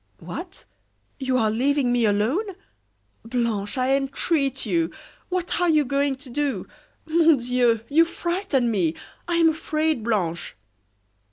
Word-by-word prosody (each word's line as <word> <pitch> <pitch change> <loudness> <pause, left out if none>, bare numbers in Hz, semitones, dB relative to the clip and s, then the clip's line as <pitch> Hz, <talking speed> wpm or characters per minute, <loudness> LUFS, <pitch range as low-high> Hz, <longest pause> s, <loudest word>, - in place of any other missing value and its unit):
"What! - - -8 0.5
you 260 -1 0
are 220 -3 +2
leaving 265 +2 +1
me 240 -2 +2
alone? 255 - 0 0.7
Blanche, 225 -3 -2
I 260 +1 +2
entreat 275 0 -1
you! 170 -5 +1 0.4
What 360 -1 -2
are 355 - +3
you 305 -2 +4
going 280 +1 0
to 265 0 -10
do? 275 -8 -1 0.4
Mon 325 -1 +4
Dieu! 240 -2 +2
you 315 +3 +5
frighten 340 - -1
me. 170 -6 +1 0.3
I 345 - 0
am 335 -1 +5
afraid, 310 -4 -1
Blanche!" 175 -7 -2
265 Hz, 135 wpm, -24 LUFS, 230-315 Hz, 0.7 s, you